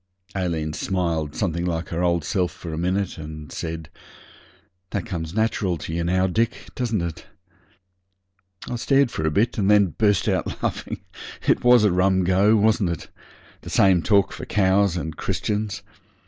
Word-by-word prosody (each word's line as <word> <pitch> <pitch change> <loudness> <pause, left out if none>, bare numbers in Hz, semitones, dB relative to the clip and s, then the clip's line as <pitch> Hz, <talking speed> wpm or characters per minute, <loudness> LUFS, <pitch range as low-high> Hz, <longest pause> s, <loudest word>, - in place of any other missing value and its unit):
Aileen 80 -5 -1
smiled 85 -5 -2
something 85 -4 -1
like 85 -1 -2
her 85 +1 -2
old 85 -3 +1
self 90 0 0
for 85 -2 -8
a - - -4
minute, 90 +1 -1
and 75 -2 -8
said 80 -1 -5 1.0
'That - - -3
comes 85 -5 -5
natural 110 -5 0
to 80 - -6
you 85 0 -1
now, 95 +2 +2
Dick, 115 +5 -1
doesn't 115 -7 -1
it?' 85 -2 -6 1.4
I 120 - -3
stared 135 +1 +3
for 80 -6 -2
a - - +3
bit, 110 +9 +1
and 100 -1 +2
then 100 -5 +4
burst 105 -3 +3
out - - -1
laughing. - - -3 0.5
It - - +3
was 125 -2 +6
a 105 - +4
rum 95 +1 +3
go, 95 +4 +4
wasn't 110 -3 +3
it? 85 -3 -5 0.5
The - - -9
same 95 -3 +4
talk 100 +1 +3
for - - -7
cows 95 -2 +2
and 80 -2 -4
Christians. 105 +4 -2
95 Hz, 165 wpm, -23 LUFS, 85-105 Hz, 1.4 s, was